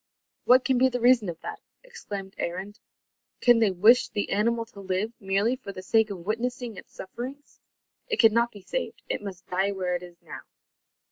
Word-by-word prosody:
"What 255 Hz, +1 st, +6 dB
can 260 Hz, -2 st, +2 dB
be 260 Hz, +1 st, +5 dB
the 250 Hz, -1 st, -2 dB
reason 240 Hz, -4 st, +4 dB
of 165 Hz, -1 st, -6 dB
that?" -, -, -7 dB, 0.2 s
exclaimed 200 Hz, -, -8 dB
Arend. 190 Hz, +4 st, -4 dB, 0.6 s
"Can 240 Hz, -2 st, +5 dB
they 220 Hz, -3 st, +4 dB
wish 210 Hz, +7 st, +5 dB
the 205 Hz, -, -3 dB
animal 230 Hz, +3 st, +1 dB
to 220 Hz, -3 st, -15 dB
live, 195 Hz, +3 st, -2 dB
merely 200 Hz, +5 st, +1 dB
for 225 Hz, -6 st, -8 dB
the 185 Hz, -1 st, -9 dB
sake 220 Hz, +2 st, +3 dB
of 180 Hz, -4 st, -7 dB
witnessing 240 Hz, +2 st, -2 dB
its -, -, -12 dB
sufferings? 255 Hz, +9 st, -8 dB, 0.5 s
It 450 Hz, -3 st, -1 dB
cannot 235 Hz, +1 st, +5 dB
be 205 Hz, -, -12 dB
saved. -, -, -4 dB
It -, -, -2 dB
must 190 Hz, -2 st, -8 dB
die 190 Hz, +2 st, 0 dB
where 185 Hz, -2 st, -2 dB
it 175 Hz, -, -3 dB
is 175 Hz, -1 st, -12 dB
now." -, -, -9 dB
215 Hz, 190 wpm, -27 LUFS, 190-245 Hz, 0.6 s, What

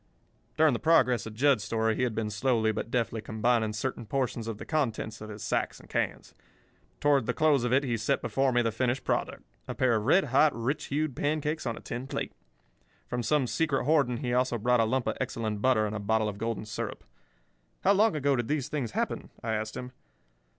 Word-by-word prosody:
'" -, -, -39 dB
During 155 Hz, -3 st, +5 dB
the 120 Hz, -, -1 dB
progress 125 Hz, -9 st, +3 dB
of 110 Hz, -, -9 dB
Jud's 130 Hz, -3 st, +3 dB
story 110 Hz, +1 st, 0 dB
he -, -, -2 dB
had 120 Hz, -3 st, 0 dB
been 110 Hz, -1 st, -2 dB
slowly 110 Hz, 0 st, +1 dB
but 110 Hz, -, -4 dB
deftly 115 Hz, -2 st, -1 dB
combining 110 Hz, 0 st, +1 dB
certain 115 Hz, +1 st, -4 dB
portions 125 Hz, -3 st, -2 dB
of 115 Hz, -2 st, -4 dB
the -, -, -8 dB
contents 115 Hz, -8 st, -2 dB
of 110 Hz, -, -7 dB
his 105 Hz, -1 st, -8 dB
sacks -, -, -1 dB
and -, -, -16 dB
cans. -, -, -2 dB, 0.7 s
Toward 140 Hz, -5 st, +3 dB
the -, -, 0 dB
close 150 Hz, -5 st, +3 dB
of 120 Hz, -, 0 dB
it 135 Hz, +2 st, +4 dB
he 120 Hz, -4 st, -1 dB
set 115 Hz, +6 st, 0 dB
before 135 Hz, -1 st, +1 dB
me 120 Hz, -1 st, +2 dB
the 115 Hz, -, +1 dB
finished 125 Hz, +3 st, -1 dB
product—a -, -, -4 dB
pair 130 Hz, -2 st, +2 dB
of 110 Hz, -, 0 dB
red 190 Hz, +9 st, +5 dB
hot, 145 Hz, +3 st, +3 dB
rich 120 Hz, +5 st, -2 dB
hued 145 Hz, -2 st, -1 dB
pancakes 150 Hz, +1 st, -1 dB
on 115 Hz, -, -2 dB
a -, -, -9 dB
tin 125 Hz, +3 st, -5 dB
plate. -, -, -4 dB, 0.7 s
From 120 Hz, -, -2 dB
some 135 Hz, +4 st, +2 dB
secret 140 Hz, 0 st, 0 dB
hoarding 140 Hz, -5 st, +3 dB
he 125 Hz, -2 st, -2 dB
also 125 Hz, -1 st, +1 dB
brought 125 Hz, +2 st, +2 dB
a 115 Hz, -, +4 dB
lump 130 Hz, +2 st, 0 dB
of -, -, -1 dB
excellent 110 Hz, -3 st, -2 dB
butter 125 Hz, -4 st, +3 dB
and 105 Hz, 0 st, -3 dB
a -, -, -2 dB
bottle 110 Hz, +1 st, +1 dB
of 100 Hz, -1 st, -5 dB
golden 115 Hz, -1 st, -3 dB
syrup. 105 Hz, -2 st, -5 dB, 0.8 s
"How 195 Hz, -, +5 dB
long 210 Hz, -1 st, +3 dB
ago 140 Hz, -2 st, +2 dB
did 120 Hz, -2 st, -2 dB
these 150 Hz, -2 st, -1 dB
things 130 Hz, -8 st, -3 dB
happen?" -, -, -2 dB
I 115 Hz, -1 st, -1 dB
asked 110 Hz, 0 st, -3 dB
him. 125 Hz, 0 st, -6 dB
120 Hz, 220 wpm, -29 LUFS, 110-140 Hz, 0.8 s, During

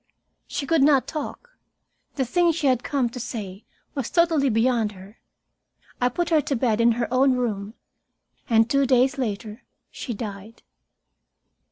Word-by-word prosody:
She 280 Hz, -, -4 dB
could 325 Hz, 0 st, +2 dB
not 275 Hz, -2 st, +4 dB
talk. 320 Hz, -, -6 dB, 0.6 s
The 265 Hz, -, 0 dB
thing 345 Hz, +7 st, +2 dB
she 320 Hz, -2 st, -3 dB
had 255 Hz, -2 st, +2 dB
come 275 Hz, -4 st, 0 dB
to 250 Hz, -, -8 dB
say 205 Hz, -4 st, -6 dB, 0.3 s
was 270 Hz, -5 st, -3 dB
totally 330 Hz, -5 st, +2 dB
beyond 225 Hz, -2 st, +1 dB
her. 195 Hz, +3 st, -14 dB, 0.8 s
I 245 Hz, -, +3 dB
put 345 Hz, +7 st, -2 dB
her 315 Hz, -2 st, +4 dB
to 280 Hz, -, -2 dB
bed 230 Hz, -2 st, +1 dB
in 235 Hz, 0 st, +5 dB
her 240 Hz, +1 st, -2 dB
own 265 Hz, +1 st, +4 dB
room. 220 Hz, -4 st, -3 dB, 0.7 s
And 225 Hz, -1 st, +4 dB
two 275 Hz, +2 st, +2 dB
days 260 Hz, +2 st, +3 dB
later 215 Hz, -1 st, -4 dB, 0.3 s
she 240 Hz, -, -6 dB
died. 205 Hz, +1 st, -8 dB
250 Hz, 155 wpm, -24 LUFS, 225-280 Hz, 0.8 s, in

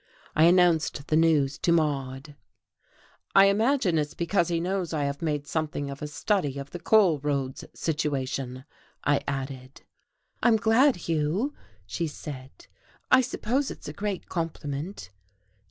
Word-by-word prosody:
I 155 Hz, -, +6 dB
announced 170 Hz, -5 st, +3 dB
the 155 Hz, -, +3 dB
news 155 Hz, -4 st, +3 dB
to 170 Hz, -, +1 dB
Maude. 145 Hz, -3 st, -1 dB, 1.0 s
"I 195 Hz, -, +8 dB
imagine 210 Hz, -, +2 dB
it's 150 Hz, -1 st, -3 dB
because 170 Hz, 0 st, +1 dB
he 170 Hz, -1 st, 0 dB
knows 180 Hz, -1 st, -2 dB
I 150 Hz, -2 st, 0 dB
have 140 Hz, +2 st, -3 dB
made 150 Hz, -3 st, -1 dB
something 150 Hz, -2 st, -3 dB
of 140 Hz, -, -9 dB
a 150 Hz, -, -3 dB
study 145 Hz, 0 st, -1 dB
of 140 Hz, 0 st, -7 dB
the 175 Hz, -, -6 dB
coal 190 Hz, -7 st, +4 dB
roads 135 Hz, -2 st, -2 dB
situation," 135 Hz, -4 st, -2 dB, 0.4 s
I 145 Hz, -1 st, +2 dB
added. 135 Hz, -1 st, -5 dB, 0.6 s
"I'm 240 Hz, -2 st, +5 dB
glad, 235 Hz, +6 st, +4 dB
Hugh," 165 Hz, -, 0 dB, 0.3 s
she 135 Hz, -, -3 dB
said. 140 Hz, -3 st, -9 dB, 0.5 s
"I 260 Hz, -, +7 dB
suppose 255 Hz, +2 st, -1 dB
it's -, -, -9 dB
a 150 Hz, -, -5 dB
great 200 Hz, +1 st, -4 dB
compliment." 155 Hz, -, -4 dB
155 Hz, 140 wpm, -27 LUFS, 140-185 Hz, 1.0 s, I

